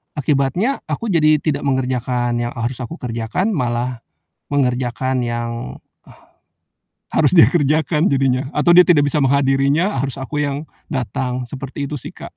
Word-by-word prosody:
akibatnya 150 - 0
aku 230 -3 -3
jadi 155 -3 +4
tidak 145 -2 -1
mengerjakan 125 -2 -1
yang, 120 0 -3
eee, 115 - -4
harus 120 +2 -3
aku 130 +6 -6
kerjakan, 120 - -2
malah 125 - -2 0.5
mengerjakan 125 -1 0
yang 120 - -4 1.3
harus 155 +3 +2
dia 165 - +7
kerjakan 155 +1 +1
jadinya, 135 -1 +1
atau 150 +3 +2
dia 180 +1 +7
tidak 160 -5 +5
bisa 150 - 0
menghadirinya, 140 +5 +2
eee, - - +1
harus 135 - -6
aku 135 +2 -5
yang 145 0 -1 0.2
datang, 130 -2 -3
seperti 135 +2 -6
itu 150 - -4
sih, - - -10
Kak. - - -9
135 Hz, 150 wpm, -19 LUFS, 125-150 Hz, 1.3 s, dia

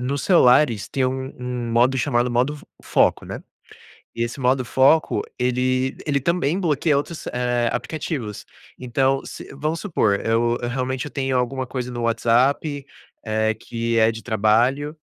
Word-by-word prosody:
nos 135 +3 -2
celulares 125 - +4
tem 135 -2 0
um 130 +1 -4
um 125 -1 -4
modo 125 +3 +3
chamado 125 -2 +1
modo 125 +5 +1
f 150 - -13 0.2
foco, - - +2
né. - - -7 0.7
E 115 - -1
esse 120 +4 -5
modo 130 0 +2
foco 135 +6 +3 0.2
ele 130 +1 0
ele 140 -2 +1
também 170 +3 0
bloqueia 155 -3 +1
outros, 155 +3 -5
eh, 120 -1 0
aplicativos. 125 - -4 0.3
Então 130 +2 +1
se - - -9
vamos 155 +4 -2
supor, 110 - +1
eu 120 +1 +1
eu 120 - -2
realmente 130 +1 -2
eu 145 - -8
tenho 130 -1 -1
alguma 130 +1 -1
coisa 125 -1 -4
no 120 - -5
WhatsApp, 130 +5 +1 0.4
eh, 110 0 +1
que 115 +1 -3
é 110 +1 +4
de 110 0 -9
trabalho 120 +7 +1
125 Hz, 160 wpm, -22 LUFS, 120-140 Hz, 0.7 s, celulares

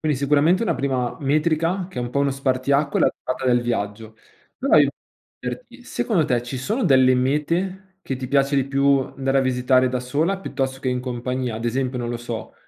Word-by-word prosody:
Quindi 155 -1 +1
sicuramente 145 - +2
una - - +1
prima 130 -3 -1
metrica 160 +5 +1
che 130 - -8
è - - -1
un 120 - -4
po' 140 - 0
uno 140 -1 +2
spartiacque 135 +2 0
è - - +4
la - - +3
durata 130 +1 -4
del 125 -1 +4
viaggio. 110 -1 -3 0.4
Però 275 - +3
io - - +4 0.5
chiederti: - - -7
secondo 180 -9 0
te 125 -4 0
ci 125 +2 -6
sono 215 - -1
delle 130 -5 +5
mete 175 +9 -1
che 135 - -3
ti 130 -1 -6
piace 140 +1 +2
di 135 - +2
più 140 0 +3
andare 135 +1 -1
a - - +4
visitare 130 0 +2
da 125 0 -2
sola 155 +10 0
piuttosto 135 -6 -3
che 130 - -2
in 125 0 -1
compagnia? 125 -1 -3
Ad 115 - -6
esempio, 125 +1 -1
non 120 - -3
lo 120 - -2
so, 115 -1 -7
135 Hz, 210 wpm, -22 LUFS, 125-150 Hz, 0.5 s, delle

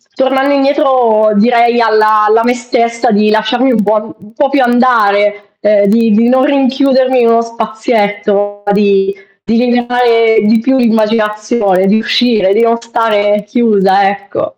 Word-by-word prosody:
tornando 265 +1 0
indietro 260 -6 +1
direi 235 +2 +2
alla 215 -1 +2
alla 220 +2 +2
me 245 +1 +1
stessa 240 0 -2
di 215 0 +1
lasciarmi 240 +5 0
un 220 - 0
po' 215 +1 -2
un 210 +2 -19
po' 275 +3 -1
più 280 -1 0
andare, 205 -4 0
ehm, 205 -1 +1
di 230 +2 +1
di 230 +3 +2
non 260 +1 +2
rinchiudermi 265 -2 +1
in 230 - +2
uno 230 0 +2
spazietto, 210 -3 -3
di 200 -1 +1 0.3
di 225 +2 -1
liberare 240 -2 +1
di 220 +2 +2
più 265 +3 0
l'immaginazione, 215 -3 -1
di 210 - +2
uscire, 225 -4 0
di 220 - 0
non 230 0 +1
stare 210 -3 -1
chiusa, 200 -4 +1
ecco. 200 +10 -6
225 Hz, 150 wpm, -11 LUFS, 210-245 Hz, 0.3 s, direi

